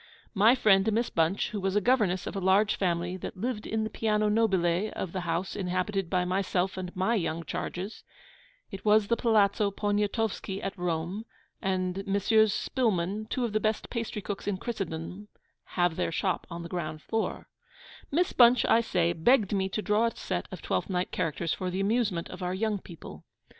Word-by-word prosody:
My 220 +4 +5
friend 205 -3 +4
Miss 230 +3 0
Bunch, 165 +4 +1
who 205 - -3
was 195 +1 0
governess 210 -5 +2
of - - -5
a - - -1
large 195 +3 +3
family 175 -1 -1
that 185 - -7
lived 220 +1 -3
in 220 0 -1
the 220 - -2
Piano 215 -1 +1
Nobile 195 -3 +2
of 185 - -4
the 185 - -3
house 170 +3 -1
inhabited 185 0 -1
by 180 -1 +1
myself 185 0 0
and 185 -1 -5
my 190 +5 +1
young 170 -6 -1
charges 190 +5 -5 0.7
(it 195 0 -7
was 215 0 +5
the 235 - +4
Palazzo 210 -3 +3
Poniatowski 205 0 -1
at 195 - -4
Rome, 175 +3 -2 0.4
and 185 0 -1
Messrs. 210 +2 +3
Spillmann, 210 -4 -1
two 255 - 0
of 225 - -4
the 215 - +2
best 215 0 -1
pastrycooks 210 -4 -4
in 200 -2 0
Christendom, 190 -2 -5 0.5
have 175 -2 +2
their - - 0
shop 185 +2 -1
on 170 -1 -6
the 170 - -7
ground 155 -3 -4
floor): 225 0 -2 0.6
Miss 340 +5 +1
Bunch, 245 0 +6
I 230 - +5
say, 175 -6 +1
begged 205 +5 +3
me 190 -1 0
to 210 +2 -3
draw 215 +2 +3
a 230 - -4
set - - -3
of - - -8
Twelfth - - -1
Night 180 -1 -1
characters 165 -1 -1
for 185 - -3
the 185 +1 -3
amusement 200 -4 0
of 180 - -8
our 180 +1 -1
young 210 0 0
people. 170 -3 -11
195 Hz, 185 wpm, -28 LUFS, 180-215 Hz, 0.7 s, Bunch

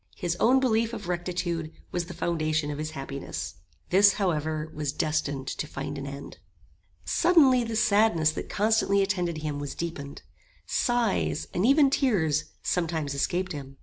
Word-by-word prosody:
His 175 -1 -2
own 260 +3 +5
belief 230 -3 +1
of 210 -5 -6
rectitude 175 -2 -2 0.2
was 175 -1 -2
the 175 -1 -9
foundation 155 -3 -1
of 145 - -5
his 155 0 -3
happiness. 135 -11 -5 0.3
This, 200 +2 +6
however, 155 -5 -1
was 150 -2 -2
destined 145 -3 -1
to 150 - -4
find 140 0 -5
an 140 0 -5
end. 140 0 -8 0.7
Suddenly 290 -8 +4
the 230 -1 -4
sadness 205 -7 +3
that - - -6
constantly 205 -2 +2
attended 175 -5 -2
him 150 -2 -3
was 145 -1 -5
deepened. 145 -4 -6 0.4
Sighs, 235 - 0
and 185 +6 +2
even 280 0 +5
tears, 165 - +1 0.2
sometimes 160 -5 -1
escaped 180 +6 -1
him. 135 -2 -7
170 Hz, 150 wpm, -27 LUFS, 150-205 Hz, 0.7 s, This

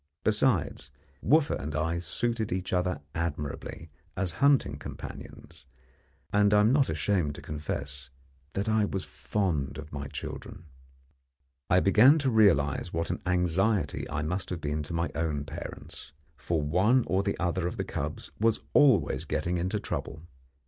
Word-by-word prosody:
Besides, 105 - +1 0.3
Wooffa 155 0 +3
and 75 +2 -5
I 80 +2 0
suited 110 +6 -2
each 90 +1 -2
other 90 -4 0
admirably 80 -1 -4 0.3
as 95 -2 0
hunting 140 -1 +3
companions, - - -10 0.7
and 105 0 +4
I 105 - +6
am 110 +4 +4
not 140 -1 +3
ashamed 80 -2 0
to - - -9
confess 70 -3 -5 0.4
that 100 +3 -2
I 110 -1 +3
was 95 -2 -2
fond 85 -10 -2
of 75 0 -9
my 70 0 -4
children. 80 - -7 1.0
I 90 +1 +5
began 120 +10 +6
to 140 -4 +1
realize 85 -8 +3
what 85 +1 -2
an - - -4
anxiety 90 +3 +1
I 75 - -2
must 90 +5 -2
have 90 - -3
been 75 0 -2
to 85 - -7
my 85 +1 -1
own 75 -3 -1
parents, 75 - -8 0.2
for 80 +3 -1
one 95 - +3
or 95 +1 +1
the 100 0 -2
other 90 0 0
of - - -5
the - - -2
cubs - - -5
was 115 0 +2
always 135 -7 +4
getting 90 0 -1
into 95 +5 -1
trouble. 80 -5 -5
90 Hz, 155 wpm, -28 LUFS, 75-105 Hz, 1.0 s, I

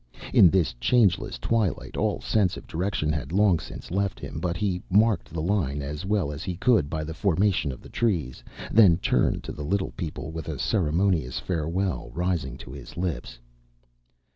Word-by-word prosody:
In 90 - +8
this 85 -7 +1
changeless 100 - +2
twilight 110 -6 -1
all - - 0
sense 100 -5 +1
of - - -10
direction 85 -3 -1
had 75 -2 -3
long 95 -2 +4
since 75 - -9
left 100 0 -1
him, - - -6
but 90 -1 -2
he 90 -2 -1
marked 105 +3 +3
the 80 -2 -3
line 80 -7 0
as 75 +6 -5
well 100 -8 +1
as 75 0 -6
he 90 - -3
could 105 - +3
by 80 0 -2
the 80 +1 -5
formation 95 -4 +1
of 65 - -9
the - - -11
trees, 80 - -1 0.3
then 100 -7 +6
turned - - +1
to - - -6
the 75 - -7
little 95 +5 -1
people 80 -3 -5
with 80 -2 -6
a - - -4
ceremonious 85 - +1
farewell 85 +5 -2
rising 85 -7 -1
to 65 -2 -10
his 70 +2 -10
lips. 85 -9 -3
85 Hz, 180 wpm, -26 LUFS, 75-100 Hz, 0.3 s, In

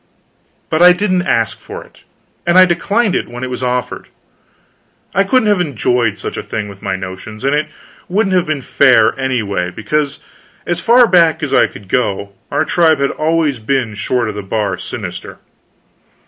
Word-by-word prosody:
But 155 - +1
I 180 0 +8
didn't 185 -1 0
ask - - 0
for - - -9
it; - - -22 0.5
and 175 +1 +4
I 185 - +9
declined 200 +4 0
it - - -1
when 120 +1 -8
it 130 - -4
was 125 - -4
offered. 125 -1 -2 1.1
I 195 - +3
couldn't 220 +3 +2
have 205 -3 +3
enjoyed 125 - 0
such - - -6
a - - -2
thing 105 -1 -4
with 100 -1 -12
my 95 -1 -2
notions; 95 +4 -8
and 140 +1 +1
it 150 +1 0 0.4
wouldn't 195 0 +1
have 180 -3 +1
been 150 -4 -2
fair, 125 -6 +4
anyway, 105 -9 -1
because 140 +10 -2 0.5
as 175 -1 -1
far 240 +5 +5
back 170 -5 +3
as - - -2
I - - +5
could 100 - -13
go, 100 -3 -1 0.2
our 155 - 0
tribe 160 -2 +3
had 140 - +1
always 155 -4 0
been 120 -1 -1
short 115 +3 -1
of 110 - -3
the 105 - -5
bar 105 +1 -2
sinister. - - -7
140 Hz, 180 wpm, -16 LUFS, 110-175 Hz, 1.1 s, I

